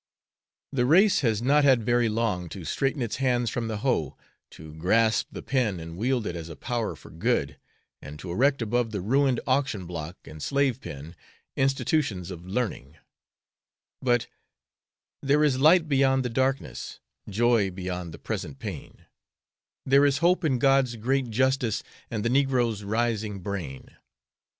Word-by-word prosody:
The 125 Hz, -2 st, +1 dB
race 190 Hz, +8 st, +5 dB
has 115 Hz, -4 st, 0 dB
not 145 Hz, +3 st, +4 dB
had 130 Hz, -5 st, +4 dB
very 120 Hz, 0 st, +2 dB
long 105 Hz, -6 st, -1 dB
to 90 Hz, -2 st, -8 dB
straighten 135 Hz, -, -1 dB
its 115 Hz, -, -3 dB
hands 125 Hz, -3 st, +1 dB
from 115 Hz, -2 st, -2 dB
the 110 Hz, -1 st, -3 dB
hoe, 100 Hz, -, 0 dB, 0.3 s
to 80 Hz, -1 st, -12 dB
grasp 110 Hz, +7 st, +2 dB
the -, -, -8 dB
pen 120 Hz, -9 st, 0 dB
and 80 Hz, 0 st, -8 dB
wield 120 Hz, +3 st, 0 dB
it 85 Hz, -, -3 dB
as 85 Hz, -1 st, -6 dB
a 80 Hz, -, -8 dB
power 120 Hz, -, -3 dB
for -, -, -15 dB
good, -, -, -1 dB, 0.4 s
and 75 Hz, +3 st, -9 dB
to 85 Hz, +3 st, -7 dB
erect 135 Hz, +6 st, +2 dB
above 120 Hz, +1 st, 0 dB
the 105 Hz, -2 st, -4 dB
ruined 130 Hz, +5 st, +2 dB
auction 130 Hz, -8 st, 0 dB
block 85 Hz, 0 st, -6 dB
and 75 Hz, 0 st, -10 dB
slave 140 Hz, -, 0 dB
pen 75 Hz, +5 st, -8 dB, 0.4 s
institutions 135 Hz, -, 0 dB
of 90 Hz, 0 st, -9 dB
learning, 95 Hz, -, -3 dB, 1.0 s
but 120 Hz, -2 st, +2 dB, 1.0 s
There 145 Hz, +2 st, +3 dB
is 135 Hz, -4 st, +2 dB
light 160 Hz, +3 st, +5 dB
beyond 135 Hz, -2 st, +2 dB
the -, -, 0 dB
darkness, 130 Hz, +3 st, -2 dB, 0.3 s
Joy 115 Hz, -1 st, +2 dB
beyond 90 Hz, -2 st, -5 dB
the -, -, -9 dB
present 70 Hz, -, -5 dB
pain; -, -, -8 dB, 0.8 s
There 140 Hz, +2 st, +5 dB
is 140 Hz, 0 st, +1 dB
hope 175 Hz, +3 st, +2 dB
in 140 Hz, -5 st, +2 dB
God's 135 Hz, -1 st, +3 dB
great 130 Hz, +3 st, 0 dB
justice 130 Hz, -1 st, +1 dB, 0.3 s
And 110 Hz, -2 st, -3 dB
the -, -, +2 dB
negro's 125 Hz, -5 st, +1 dB
rising 110 Hz, -1 st, -1 dB
brain. 90 Hz, -9 st, -6 dB
120 Hz, 155 wpm, -26 LUFS, 95-135 Hz, 1.0 s, race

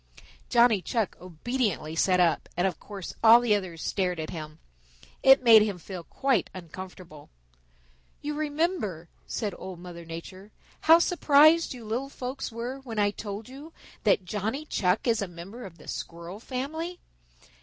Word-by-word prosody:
Johnny 235 Hz, -4 st, +5 dB
Chuck 220 Hz, 0 st, -1 dB
obediently 185 Hz, -2 st, -2 dB
sat 180 Hz, +2 st, +3 dB
up, 175 Hz, -2 st, +2 dB
and 175 Hz, -, +2 dB
of 190 Hz, -, -1 dB
course 200 Hz, -4 st, -8 dB
all 230 Hz, +1 st, +9 dB
the 240 Hz, -3 st, +2 dB
others 185 Hz, -5 st, -2 dB
stared 180 Hz, -3 st, -1 dB
at 155 Hz, -, -4 dB
him. 155 Hz, -2 st, -7 dB, 0.6 s
It 270 Hz, 0 st, +7 dB
made 225 Hz, -3 st, +9 dB
him 210 Hz, -3 st, 0 dB
feel 180 Hz, +1 st, -8 dB
quite 265 Hz, -8 st, 0 dB
uncomfortable. 180 Hz, -3 st, -10 dB, 0.9 s
"You 300 Hz, +1 st, -4 dB
remember," 295 Hz, -, -2 dB, 0.2 s
said 210 Hz, -3 st, -3 dB
Old 190 Hz, -2 st, -8 dB
Mother 175 Hz, -1 st, -9 dB
Nature, 185 Hz, +5 st, -9 dB, 0.3 s
"how 325 Hz, +1 st, +7 dB
surprised 315 Hz, -3 st, +4 dB
you 235 Hz, -3 st, -10 dB
little 245 Hz, +6 st, -2 dB
folks 260 Hz, -1 st, -5 dB
were 240 Hz, +4 st, -5 dB
when 240 Hz, -5 st, -8 dB
I 205 Hz, -1 st, +3 dB
told 210 Hz, +1 st, -7 dB
you 285 Hz, +5 st, -11 dB, 0.3 s
that 185 Hz, -, +3 dB
Johnny 220 Hz, +10 st, -3 dB
Chuck 185 Hz, -8 st, 0 dB
is 230 Hz, -3 st, +2 dB
a 200 Hz, -, -2 dB
member 180 Hz, +8 st, -9 dB
of 170 Hz, -3 st, -15 dB
the -, -, -16 dB
Squirrel 170 Hz, +4 st, -6 dB
family. 315 Hz, +9 st, -4 dB
210 Hz, 155 wpm, -27 LUFS, 180-260 Hz, 0.9 s, all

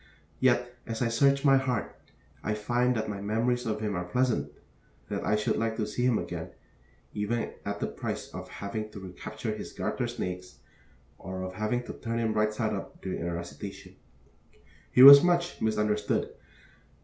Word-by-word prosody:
Yet, 120 Hz, -1 st, +2 dB
as 115 Hz, 0 st, -2 dB
I 115 Hz, -, +1 dB
search 140 Hz, +4 st, +3 dB
my 135 Hz, -1 st, +7 dB
heart, 130 Hz, -4 st, -2 dB, 0.5 s
I 105 Hz, -, -1 dB
find 120 Hz, +4 st, +1 dB
that 110 Hz, -1 st, -1 dB
my 100 Hz, -2 st, -4 dB
memories 115 Hz, +4 st, 0 dB
of 110 Hz, -1 st, -2 dB
him 105 Hz, -2 st, -1 dB
are 90 Hz, -, -2 dB
pleasant; 125 Hz, +7 st, 0 dB, 0.6 s
that -, -, -3 dB
I 105 Hz, -, +2 dB
should 105 Hz, -, 0 dB
like 115 Hz, 0 st, 0 dB
to 110 Hz, -, 0 dB
see 105 Hz, +4 st, -3 dB
him 125 Hz, -3 st, +3 dB
again, -, -, -5 dB, 0.6 s
even 105 Hz, +3 st, -2 dB
at -, -, -3 dB
the -, -, -1 dB
price -, -, -5 dB
of -, -, -7 dB
having 105 Hz, +2 st, -5 dB
to 100 Hz, -, -7 dB
recapture 95 Hz, -2 st, -6 dB
his -, -, -8 dB
garter -, -, -2 dB
snakes, 90 Hz, 0 st, -5 dB, 0.6 s
or 95 Hz, -1 st, -5 dB
of 95 Hz, 0 st, -5 dB
having 110 Hz, +5 st, -1 dB
to -, -, -7 dB
turn 115 Hz, 0 st, -4 dB
him 115 Hz, -2 st, 0 dB
right 105 Hz, 0 st, +2 dB
side 110 Hz, 0 st, -1 dB
up 100 Hz, -, -6 dB
during 95 Hz, -, -3 dB
a 85 Hz, +1 st, -2 dB
recitation. 95 Hz, +2 st, -8 dB, 1.0 s
He 125 Hz, -, +7 dB
was 140 Hz, +1 st, +13 dB
much 175 Hz, 0 st, +1 dB
misunderstood. 105 Hz, -1 st, 0 dB
110 Hz, 175 wpm, -29 LUFS, 100-120 Hz, 1.0 s, was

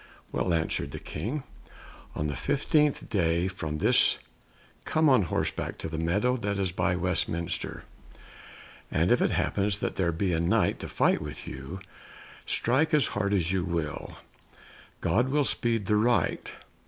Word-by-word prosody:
"Well," 90 Hz, -, 0 dB
answered 80 Hz, -4 st, -1 dB
the -, -, -5 dB
King, 135 Hz, +6 st, -4 dB, 0.7 s
"on 75 Hz, -, -2 dB
the 75 Hz, -2 st, -2 dB
fifteenth 150 Hz, -, +1 dB
day 85 Hz, -3 st, +1 dB
from 80 Hz, -5 st, -4 dB
this -, -, +4 dB, 0.7 s
come 155 Hz, 0 st, +2 dB
on 130 Hz, -5 st, +6 dB
horseback 85 Hz, -, -2 dB
to -, -, -5 dB
the 80 Hz, 0 st, -4 dB
meadow 100 Hz, +10 st, +1 dB
that 100 Hz, -3 st, -2 dB
is 95 Hz, -2 st, 0 dB
by 90 Hz, 0 st, +1 dB
Westminster. 85 Hz, -1 st, -1 dB, 1.1 s
And -, -, +1 dB
if -, -, +4 dB
it -, -, +3 dB
happens 100 Hz, 0 st, 0 dB
that -, -, -3 dB
there 85 Hz, -3 st, +2 dB
be 90 Hz, +2 st, 0 dB
a 80 Hz, -, +1 dB
Knight 85 Hz, -, +2 dB
to -, -, -6 dB
fight -, -, +2 dB
with 75 Hz, -3 st, -7 dB
you, 65 Hz, +9 st, -7 dB, 0.7 s
strike 145 Hz, +7 st, +2 dB
as 150 Hz, -, +3 dB
hard 100 Hz, -1 st, 0 dB
as 90 Hz, -4 st, +1 dB
you 95 Hz, -2 st, +1 dB
will, 85 Hz, -4 st, -3 dB, 0.8 s
God 120 Hz, +5 st, +2 dB
will 145 Hz, +2 st, +2 dB
speed 115 Hz, -5 st, 0 dB
the 105 Hz, +2 st, +2 dB
right. 120 Hz, +3 st, +1 dB
95 Hz, 155 wpm, -28 LUFS, 85-115 Hz, 1.1 s, on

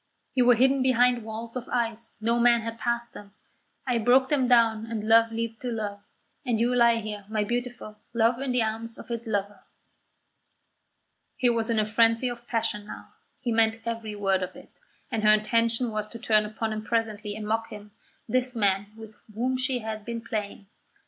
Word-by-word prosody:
You 250 Hz, -2 st, +3 dB
were 245 Hz, -, +7 dB
hidden 265 Hz, +3 st, +3 dB
behind 250 Hz, -1 st, +3 dB
walls 225 Hz, +2 st, -7 dB
of 250 Hz, -1 st, -5 dB
ice; 230 Hz, -2 st, -2 dB
no 230 Hz, +2 st, +1 dB
man 235 Hz, -1 st, +5 dB
had 230 Hz, +1 st, -6 dB
passed 235 Hz, 0 st, -1 dB
them; 200 Hz, 0 st, -12 dB, 0.5 s
I 250 Hz, -3 st, +1 dB
broke 255 Hz, +3 st, +4 dB
them 270 Hz, -4 st, +2 dB
down 230 Hz, -2 st, +3 dB
and 220 Hz, -2 st, -4 dB
love 225 Hz, 0 st, +5 dB
leaped 225 Hz, 0 st, -4 dB
to 250 Hz, -, -3 dB
love, 205 Hz, -3 st, -4 dB, 0.4 s
and 240 Hz, -5 st, 0 dB
you 240 Hz, +2 st, +2 dB
lie 235 Hz, -1 st, +5 dB
here, 210 Hz, -2 st, -5 dB
my 215 Hz, -1 st, 0 dB
beautiful, 240 Hz, -1 st, -4 dB
love 235 Hz, +1 st, +2 dB
in 275 Hz, -2 st, -1 dB
the 250 Hz, -2 st, +2 dB
arms 225 Hz, +1 st, -4 dB
of -, -, -10 dB
its 235 Hz, 0 st, -4 dB
lover." 205 Hz, -2 st, -2 dB, 1.8 s
He 250 Hz, -4 st, +3 dB
was 230 Hz, 0 st, -1 dB
in 230 Hz, -, +1 dB
a 215 Hz, -, +2 dB
frenzy 230 Hz, +3 st, +3 dB
of 240 Hz, 0 st, -8 dB
passion 210 Hz, -3 st, -1 dB
now; -, -, -9 dB, 0.3 s
he 245 Hz, -2 st, -1 dB
meant 225 Hz, 0 st, +2 dB
every 230 Hz, -2 st, -4 dB
word 195 Hz, -2 st, +1 dB
of 185 Hz, -, -5 dB
it; -, -, -14 dB, 0.4 s
and 225 Hz, -3 st, -1 dB
her 215 Hz, 0 st, +7 dB
intention 230 Hz, +2 st, +1 dB
was 215 Hz, -1 st, -3 dB
to 230 Hz, -, -8 dB
turn 215 Hz, -2 st, +2 dB
upon 220 Hz, +1 st, -3 dB
him 215 Hz, -, -4 dB
presently 215 Hz, -2 st, -2 dB
and 215 Hz, -1 st, -6 dB
mock 225 Hz, +1 st, 0 dB
him, 210 Hz, 0 st, -10 dB, 0.4 s
this 250 Hz, +1 st, 0 dB
man 200 Hz, -2 st, +1 dB
with 220 Hz, -1 st, -12 dB, 0.2 s
whom 255 Hz, +3 st, 0 dB
she 255 Hz, 0 st, 0 dB
had 215 Hz, -1 st, -4 dB
been 235 Hz, +1 st, -5 dB
playing. 210 Hz, -3 st, -5 dB
230 Hz, 195 wpm, -26 LUFS, 215-240 Hz, 1.8 s, were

